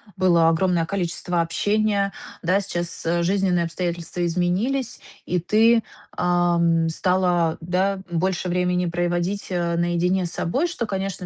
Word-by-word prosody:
было 175 -3 +4
огромное 170 0 +2
количество 175 -2 -1
общения. 205 +3 0 0.3
Да, 185 +4 +2
сейчас, 175 -4 -3
э, 170 +1 +1
жизненные 185 -2 +1
обстоятельства 175 0 -3
изменились, 195 +10 -1 0.2
и 180 - -1
ты, 225 +5 +3 0.3
ам, 170 -2 +2
стала, 175 -1 +1
да, 185 +4 0
м, 170 -1 -1
больше 185 0 -1
времени 180 0 0
проводить, 175 +3 -1
а, 170 -1 0
наедине 175 +2 +1
с 170 - -3
собой, 275 - -1
что, 240 -7 -3
конечно, 195 -2 -4
180 Hz, 135 wpm, -23 LUFS, 170-195 Hz, 0.3 s, было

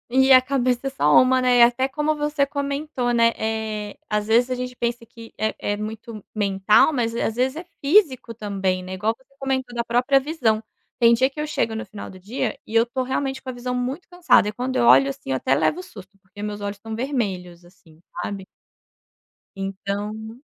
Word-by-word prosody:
E 265 +2 +4
a 255 - +8
cabeça 255 -1 0
é - - 0
só 150 - +5
uma, 255 0 +3
né, 250 -1 +4
e - - +7
até 245 +2 +4
como 300 +3 -1
você 295 -1 0
comentou, 280 -3 -2
né, 230 0 +4
eh, 220 -1 -3
às 210 0 -1
vezes 235 +3 +3
a 255 - -1
gente 250 0 -5
pensa 235 0 -3
que 230 -1 -14
é 220 +1 -1 0.2
é - - -4
muito 215 0 -7
mental, 200 +5 +3
mas, 235 -5 -1
eh, - - -1
às 220 - -1
vezes 260 +3 0
é 330 - -6 0.2
físico 280 - +3
também, 195 -4 -2
né, 185 +1 -7
igual 215 +4 -1
você 265 +1 -29
comentou 260 -2 -2
da 235 -1 -1
própria 245 +4 +3
visão. 260 -7 0 0.4
Tem 235 -1 +6
dia 260 +3 +3
que 275 - -11
eu 305 - -3
chego 230 -6 -1
no 225 - -4
final 200 +1 -9
do 185 - -13
dia 220 +4 -3
e 225 - -7
eu 230 +1 +5
tô 250 +2 -3
realmente 265 +1 -2
com 260 - -8
a - - -2
visão 250 +1 -4
muito 255 +8 -3
cansada 335 - +3
e - - -1
quando 250 +3 -3
eu - - +2
olho 130 +3 +6
assim, 135 0 -6
eu - - +1
até 135 +1 +1
levo 300 - +1
um - - -4
susto, 195 - -13
porque 195 +2 -11
meus 210 0 -5
olhos 200 0 -4
estão 220 +2 -7
vermelhos, 195 -9 -3
assim, 165 -3 -21 0.2
sabe. 195 +1 -5 1.1
Então 205 +4 -5
235 Hz, 215 wpm, -23 LUFS, 210-260 Hz, 1.1 s, a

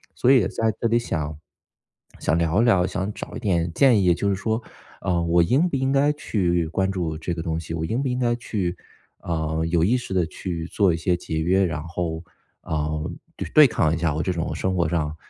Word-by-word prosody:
所 130 - +3
以 135 - +7
也 95 - +1
在 110 +2 0
这 115 - +2
里 115 - +3
想 75 -9 -3 0.8
想 80 - +1
聊 85 +5 +2
一 120 - +3
聊， 95 -5 +4
想 100 +1 -3
找 - - -8
一 - - -4
点 85 -6 0
建 120 -5 +5
议 90 - +5
就 100 +3 -1
是 95 - +1
说， 110 +4 -1 0.4
啊， 90 -3 0
我 85 0 +3
应 140 - +2
不 145 - -2
应 130 0 0
该 140 +2 +3
去 90 - 0
关 95 +3 0
注 85 -5 -2
这 85 +2 -3
个 80 -1 -4
东 80 0 -2
西， 80 0 -7
我 80 - -3
应 115 +10 -1
不 - - 0
应 125 - -1
该 120 -1 +1
去， 95 -7 -3 0.4
呃， 80 -1 -2
有 85 -1 +2
意 120 +5 +3
识 125 -6 -6
地 90 -3 +2
去 85 -2 -5
做 100 -3 +2
一 80 - -1
些 90 +2 +1
节 80 -2 -4
约， 95 +4 +2
然 85 -3 -3
后， 85 -1 -4 0.4
呃， 75 +1 -2 0.3
对 - - -5
对 155 -1 +10
抗 85 -9 +1
一 80 - 0
下 85 -3 0
我 80 - -1
这 95 - 0
种 85 0 -3
生 95 0 -1
活 85 -3 +1
上 80 -2 -1
90 Hz, 250 characters per minute, -23 LUFS, 80-110 Hz, 0.8 s, 对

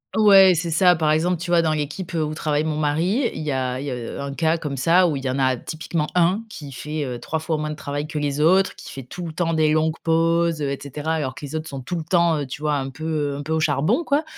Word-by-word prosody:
Ouais, 195 -3 +7
c'est 170 +1 -2
ça. 180 +2 +5
Par 155 -1 +1
exemple, 170 +4 +2
tu 175 -1 -4
vois, 170 -1 +5
dans 160 -1 +1
l'équipe 155 +5 -4
où 155 -2 -1
travaille 150 -1 0
mon 155 -1 -2
mari, 170 - +1
il - - -6
y 155 -1 -2
a 130 -1 -2
il - - -5
y 140 - -3
a, - - -2
heu, 120 +3 -6
un 140 0 -4
cas 160 +2 +1
comme 145 -4 -5
ça 170 +5 +4
où 145 - -1
il 135 - -7
y - - 0
en 130 - -1
a 130 -1 +2
typiquement 155 +3 -3
1 180 +4 +3
qui 145 -8 -9
fait, 150 +4 -4
heu, 125 -3 -4
3 160 +5 -3
fois 160 0 -2
moins 150 0 -3
de 150 - -4
travail 145 0 -4
que 150 0 -6
les 145 0 -1
autres, 185 +5 +3
qui - - -10
fait 135 - -7
tout 175 +8 -7
le 160 - -6
temps 165 0 -1
des 155 -1 +3
longues 155 +1 +1
pauses, 165 -1 +2
heu, 140 -1 -1
et 140 - -4
cetera, 150 +3 -3
alors 130 -5 -3
que - - -11
les 140 - -9
autres 155 0 -3
sont 135 -2 -6
tout 175 +7 -4
le 165 - -3
temps, 170 -2 +3
heu, 145 - -3
tu 150 +4 -7
vois, 150 -1 +1
un 135 -1 -3
peu, 155 +4 -10 0.3
heu, - - -5
un 145 - -5
peu 155 - -6
au 160 - +2
charbon, 155 - +1
quoi, 290 +2 +1
155 Hz, 300 wpm, -22 LUFS, 145-170 Hz, 0.3 s, Ouais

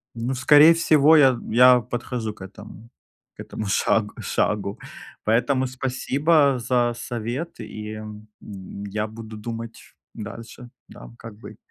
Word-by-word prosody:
Ну, 120 +3 -3
в 130 - -5
скорее 150 +4 +7
всего, 160 -2 +4
я 135 -3 +6
т - - -9 0.2
я 125 0 +7
подхожу 120 -2 -5
к 105 - -19
этому, 105 +4 -12 0.5
к - - -38
этому 110 - -6
шагу 105 +1 0
шагу. 100 -1 -2 0.4
Поэтому 125 +4 +1
спасибо 135 +3 +1
за 120 0 0
совет, 120 +7 -5
и, 105 0 -8
эм, 105 0 -10
м, 100 0 -10
я 105 +2 -3
буду 110 0 -10
думать. 115 +1 -7 0.4
Дальше, 115 +3 -10 0.2
да, - - -13
как 115 -2 -10
быть. - - -12
115 Hz, 145 wpm, -23 LUFS, 105-130 Hz, 0.5 s, скорее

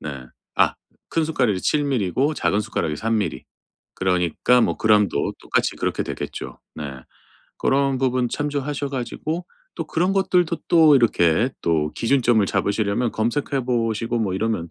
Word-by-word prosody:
네. 70 -4 -7 0.3
아 - - +3 0.4
큰 165 - +1
숟가락이 120 -11 0
7mL 135 -10 +1
고 145 - +1
작은 105 - +1
숟가락이 85 -8 -2
3mL. 110 -3 -1 0.5
그러니까 90 +6 +2
뭐 - - +1
그램도 105 -8 +2
똑같이 - - 0
그렇게 - - -1
되겠죠. - - -6
네. 75 - -6 0.7
그런 135 -1 +1
부분 130 -1 +1
참조하셔 145 0 -2
가지고 155 +6 -4 0.3
또 - - -5
그런 180 +4 0
것들도 180 -3 +2
또 160 -4 +6
이렇게 110 -2 +3
또 75 -2 +1
기준점을 120 -3 +2
잡으시려면 105 +4 0
검색해 130 +4 -1
보시고 115 -1 0
뭐 105 -5 -1
이러면 95 -5 -2
120 Hz, 315 characters per minute, -22 LUFS, 100-140 Hz, 0.7 s, 또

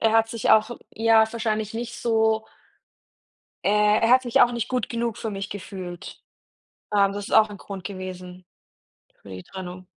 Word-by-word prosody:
er 225 - +3
hat 225 0 +3
sich 230 -1 -1
auch 220 +2 +5 0.2
ja 225 0 +4
wahrscheinlich 220 -2 -2
nicht 240 +1 -5
so 220 -1 +1 1.2
äh, 210 +1 +4
er 225 - +2
hat 255 +1 +6
sich 240 -2 +1
auch 245 - +5
nicht 235 -1 -3
gut 250 -3 -1
genug 235 -1 -3
für 225 - -4
mich 195 -1 -5
gefühlt. 185 -3 -8 0.7
Ähm, 200 -1 +4
das 205 0 -6
ist - - -1
auch 220 -1 +6
ein 205 - -8
Grund 195 -2 -9
gewesen 185 -2 -8 0.8
für 100 - -13
die 90 -1 -8
Trennung. 185 - -9
215 Hz, 175 wpm, -24 LUFS, 190-225 Hz, 1.2 s, hat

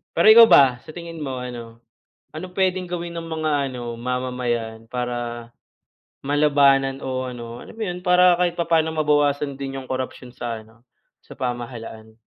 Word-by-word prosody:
Pero 190 +6 +7
ikaw 230 +1 +10
ba, 130 - +6
sa 155 - -13
tingin 170 -2 -8
mo 130 -4 -4
ano, 120 -2 -9 0.5
anong 180 +4 -7
puwedeng 185 0 0
gawin 175 -1 -5
ng 170 - -4
mga 150 -4 -1
ano 120 -2 -6
mamamayan 120 -2 -3
para 120 -1 -4 0.7
malabanan 140 -2 +3
o 130 -1 -3
ano, 120 -1 -8
alam - - -12
mo 225 - -10
'yon 180 -3 -4
para 180 0 +5
kahit 175 -1 +1
papaano 165 -2 +1
mabawasan 145 -2 +1
din 135 -1 -5
yung 130 - -14
korapsyon 130 -1 -4
sa 120 -2 -5
ano, 115 +2 -22 0.4
sa - - -11
pamahalaan? 120 -3 -6
135 Hz, 155 wpm, -22 LUFS, 120-165 Hz, 0.7 s, ikaw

